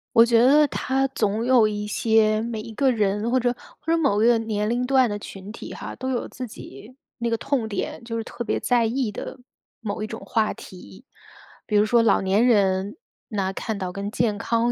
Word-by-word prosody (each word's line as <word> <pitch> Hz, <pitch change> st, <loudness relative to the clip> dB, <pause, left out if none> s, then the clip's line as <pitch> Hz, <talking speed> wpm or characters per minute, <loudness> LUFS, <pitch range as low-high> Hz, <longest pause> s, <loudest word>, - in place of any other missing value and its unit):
我 230 Hz, -, +9 dB
觉 235 Hz, -1 st, +4 dB
得 295 Hz, +3 st, +6 dB
它 270 Hz, 0 st, 0 dB
总 220 Hz, -4 st, -1 dB
有 245 Hz, -3 st, +5 dB
一 210 Hz, 0 st, -3 dB
些 215 Hz, 0 st, +2 dB
每 225 Hz, -1 st, -4 dB
一 225 Hz, -, -9 dB
个 270 Hz, +1 st, +3 dB
人 210 Hz, 0 st, 0 dB
或 260 Hz, -, +3 dB
者 245 Hz, 0 st, 0 dB, 0.2 s
或 325 Hz, -, -3 dB
者 335 Hz, -, +3 dB
某 270 Hz, -10 st, +2 dB
一 -, -, +5 dB
个 240 Hz, -1 st, +5 dB
年 215 Hz, -2 st, -2 dB
龄 245 Hz, +2 st, 0 dB
段 260 Hz, -2 st, +3 dB
的 205 Hz, -, -3 dB
群 195 Hz, -1 st, -9 dB
体 225 Hz, -, -9 dB
哈， -, -, -7 dB
都 260 Hz, +1 st, -4 dB
有 245 Hz, -, -2 dB
自 255 Hz, -, -7 dB
己 210 Hz, -, -12 dB, 0.2 s
那 235 Hz, -, -2 dB
个 -, -, +2 dB
痛 250 Hz, -1 st, -1 dB
点， 215 Hz, +3 st, -4 dB
就 230 Hz, 0 st, -5 dB
是 225 Hz, -, -2 dB
特 240 Hz, -, -6 dB
别 -, -, -1 dB
在 240 Hz, -2 st, +2 dB
意 235 Hz, 0 st, -1 dB
的 235 Hz, -, -7 dB, 0.4 s
某 215 Hz, -1 st, -4 dB
一 -, -, -3 dB
种 225 Hz, -, -7 dB
话 220 Hz, -2 st, 0 dB
题。 100 Hz, -, -13 dB, 0.6 s
比 210 Hz, -, -2 dB
如 205 Hz, -, +5 dB
说 230 Hz, +2 st, +3 dB
老 225 Hz, -, +3 dB
年 195 Hz, +4 st, +2 dB
人， 200 Hz, -2 st, +2 dB, 0.3 s
那 195 Hz, -4 st, -2 dB
看 215 Hz, +1 st, -4 dB
到 185 Hz, -2 st, -3 dB
跟 200 Hz, +2 st, -5 dB
健 220 Hz, -2 st, 0 dB
康 230 Hz, +3 st, +1 dB
225 Hz, 235 characters per minute, -24 LUFS, 210-245 Hz, 0.6 s, 我